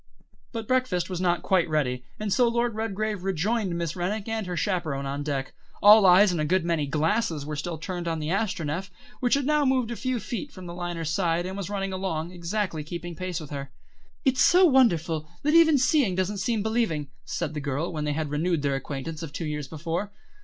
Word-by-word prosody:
But 225 -3 -5
breakfast 200 -9 +1
was 180 -1 -3
not 175 -1 +1
quite 180 -3 +2
ready, 125 -5 0 0.2
and 210 -2 -1
so 245 -2 +4
Lord 235 0 +1
Redgrave 215 -2 -2
rejoined 195 +1 0
Miss 170 -2 -2
Rennick 195 +4 -2
and 220 -3 -2
her 180 -1 -3
chaperon 160 -6 -1
on 140 +1 -3
deck. 140 -2 -3 0.3
All 210 -1 +8
eyes 185 +2 +7
and 170 -3 -1
a - - +1
good 180 +3 +1
many 165 -4 0
glasses 160 +1 0
were 150 +1 -4
still 160 +3 -4
turned 175 +1 -5
on 165 -1 0
the 155 +1 -3
Astronef, 185 -3 -1 0.3
which 245 0 +3
had 280 -1 0
now 300 +1 +3
moved 260 -3 +1
a - - -3
few 255 0 -2
feet 235 +7 -5
away - - -23
from 185 -1 -10
the 170 - -7
liner's 175 -3 -3
side, 175 -1 +1
and 190 +1 -4
was 200 -2 -4
running 195 -1 -2
along, 175 -3 -3
exactly 175 -2 -2
keeping 170 +2 -6
pace 185 0 -3
with 155 -2 -10
her. 140 -1 -5 0.6
"It's 260 -1 +3
so 365 +2 +6
wonderful, 170 - +3
that 300 +2 +2
even 325 -3 +7
seeing 260 - +3
doesn't 190 +2 -1
seem 220 +1 0
believing," 215 - -1
said 155 - -3
the 150 - -4
girl, 145 +5 -2
when 155 -2 -2
they 150 - 0
had 155 -1 -3
renewed 160 +1 0
their 140 -1 +1
acquaintance 140 +4 -5
of 165 -3 -6
two 155 +3 -4
years 150 -2 -3
before. 165 +6 -3
180 Hz, 215 wpm, -26 LUFS, 155-215 Hz, 0.6 s, All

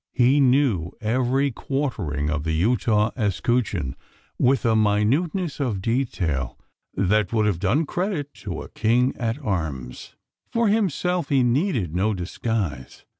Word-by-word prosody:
He 130 +3 +4
knew 125 - +2
every 130 +4 +1
quartering: 100 - -2
of 75 -1 -2
the 80 0 -1
Utah 105 +4 +2
escutcheon, 105 - 0 0.4
with 130 -2 +2
a 115 -1 +3
minuteness 135 - +1
of 120 -8 -1
detail 95 - -1 0.4
that 100 0 +1
would 110 -2 +2
have 100 -5 0
done 115 - +1
credit 175 -3 -3
to 90 -6 -5
a - - -11
King 120 +4 +1
at 115 0 -1
arms. 80 - -4 0.4
For 230 -2 +2
himself 180 -5 0
he 135 -3 +3
needed 120 - +1
no 100 +4 +1
disguise. 90 - -4
115 Hz, 130 wpm, -24 LUFS, 95-135 Hz, 0.4 s, He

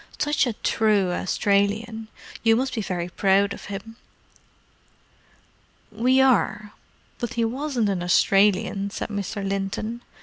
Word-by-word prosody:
Such 295 -2 +1
a 240 - -1
true 210 -4 +1
Australian! 205 +5 0 0.3
You 225 -1 +4
must 255 +2 -1
be 225 - -2
very 180 -3 -3
proud 200 +2 +2
of - - -10
him." 205 +3 -8 1.9
"We 250 +5 +2
are—but 240 -2 -1
he 230 -1 +1
wasn't 250 -2 -1
an 190 -3 -1
Australian," 195 +2 +2
said 200 - -5
Mr. 200 -1 -4
Linton. 200 +4 -3
210 Hz, 115 wpm, -24 LUFS, 195-230 Hz, 1.9 s, You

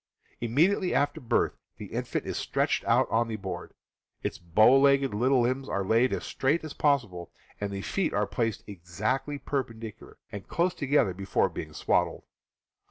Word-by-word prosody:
Immediately 170 - +2
after 145 +2 +1
birth 120 - 0 0.2
the - - -9
infant - - -2
is - - -4
stretched - - 0
out - - +3
on 115 +1 +2
the 115 - -3
board, 95 -4 -6 0.5
its - - -3
bowlegged 135 +9 +4
little 125 +4 +3
limbs 130 +3 -1
are 100 -1 -1
laid 115 +5 +3
as - - -2
straight 145 +6 0
as 155 - -6
possible, 110 - 0 0.3
and 100 -1 -3
the 100 0 -5
feet 190 -5 -1
are 105 0 +1
placed 110 +2 -2
exactly 105 - -3
perpendicular 115 -6 -5
and 100 - -8
close 175 +1 +1
together 140 - +1
before 95 +1 0
being 75 - -7
swaddled. 75 - 0
120 Hz, 160 wpm, -28 LUFS, 100-140 Hz, 0.5 s, bowlegged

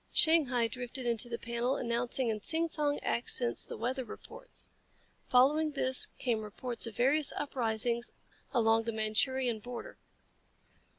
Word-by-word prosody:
Shanghai 270 -8 +4
drifted 250 +2 -5
into 240 0 0
the 235 - -3
panel, 235 +3 -1
announcing 240 0 0
in 215 -1 -2
sing 330 +6 0
song 290 -2 0
accents 240 0 -1
the - - -6
weather 255 +3 -2
reports. - - -8 0.6
Following 295 +5 +4
this 260 -2 +4
came 235 -4 0
reports 230 +3 -3
of 225 - -7
various 275 +5 +3
uprisings 235 -3 -1 0.4
along 225 -1 +3
the 230 - -2
Manchurian 225 +2 +1
border. 240 +2 -8
245 Hz, 130 wpm, -32 LUFS, 230-270 Hz, 0.6 s, Shanghai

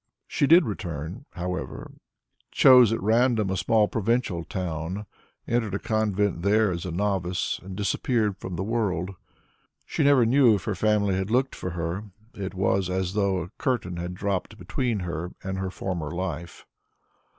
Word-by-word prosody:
She 140 - +1
did 165 +2 +7
return, 85 - -5
however, 90 -6 -5 0.6
chose 125 -4 +7
at 115 - 0
random 110 -2 +3
a - - 0
small 110 +2 +3
provincial 115 -5 0
town, 90 +3 -4 0.4
entered 115 -4 0
a - - +1
convent 105 -4 0
there 105 +2 +3
as 85 0 -4
a 90 - -3
novice, 90 -1 -1
and 95 0 -8
disappeared 105 +1 0
from 95 -1 -5
the 90 - -2
world. 100 -5 -1 0.7
She - - -1
never 140 -4 +5
knew 120 -2 +5
if 95 - -4
her 105 - -1
family 105 0 +2
had 95 +1 -1
looked 130 +3 +1
for 90 - -5
her; 85 +4 -3 0.3
it 95 -1 -5
was 95 0 +1
as 95 0 -1
though 100 -4 +1
a 90 - -11
curtain 105 -10 -1
had 90 +1 -4
dropped 95 -1 -2
between 115 +3 -2
her 85 0 -4
and 95 0 -3
her 95 0 -2
former 90 -4 -4
life. 85 -1 -5
95 Hz, 160 wpm, -26 LUFS, 90-110 Hz, 0.7 s, did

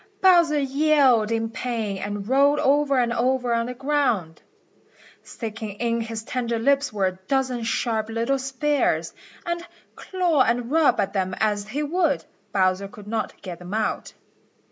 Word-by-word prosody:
Bowser 345 -6 +5
yelled 275 -5 +3
with 225 0 -2
pain 220 -6 -3
and 205 0 -5
rolled 280 +3 +4
over 280 0 +2
and 240 -1 +1
over 245 0 +1
on 230 0 0
the 250 - -5
ground. 245 - 0 0.8
Sticking 220 -2 -6
in 230 +2 -1
his 225 -1 -5
tender 235 -1 -2
lips 280 +4 +2
were 200 -3 0
a 185 0 -2
dozen 260 -3 0
sharp 225 -1 -1
little 230 +4 0
spears, 265 - 0 0.3
and 345 0 -2 0.3
claw 355 -6 0
and 240 0 +1
rub 320 -1 +3
at 195 0 0
them 185 -2 -1
as 205 -1 0
he 280 +7 -3
would, 320 -1 0 0.3
Bowser 190 0 +1
could 205 +1 -13
not 220 0 -3
get 180 -3 -7
them 180 +3 -6
out. 220 -1 -2
235 Hz, 155 wpm, -24 LUFS, 215-280 Hz, 0.8 s, Bowser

